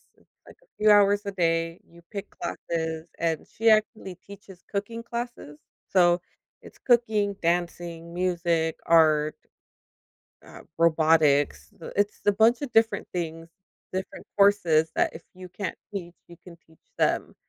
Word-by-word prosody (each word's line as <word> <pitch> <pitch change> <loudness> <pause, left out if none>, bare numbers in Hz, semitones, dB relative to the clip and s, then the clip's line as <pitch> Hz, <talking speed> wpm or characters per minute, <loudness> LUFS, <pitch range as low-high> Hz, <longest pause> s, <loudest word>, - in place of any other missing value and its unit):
It's - - -30 0.2
like - - -16
a - - -31
few 215 0 +4
hours 205 0 +4
a 200 - -3
day, 165 -2 0
you 170 0 -18
pick 200 -2 -6
classes, 160 -1 -4
and 165 -2 -2
she 225 +1 +1
actually 215 -3 +1
teaches 195 0 -14
cooking 215 +3 -4
classes, 235 -11 -6 0.3
so 175 -2 +4 0.4
it's - - -15
cooking, 220 -5 +1
dancing, 170 -1 -2
music, 170 -2 0
art, 155 -2 +4 1.1
uh, - - -13 0.2
robotics. 155 -3 +3
Th - - -8
It's 205 +1 0
a 205 - +5
bunch 225 +4 +3
of 275 - -5
different 225 0 +2
things, 165 -2 -5 0.4
different 190 0 -6
courses 175 -6 +4
that - - +2
if 160 - -10
you 185 0 -11
can't 185 +3 -5 0.2
teach, 175 -3 -6
you 170 - -13
can 175 -2 -12
teach 160 0 -25
them. - - 0
175 Hz, 145 wpm, -26 LUFS, 165-205 Hz, 1.1 s, a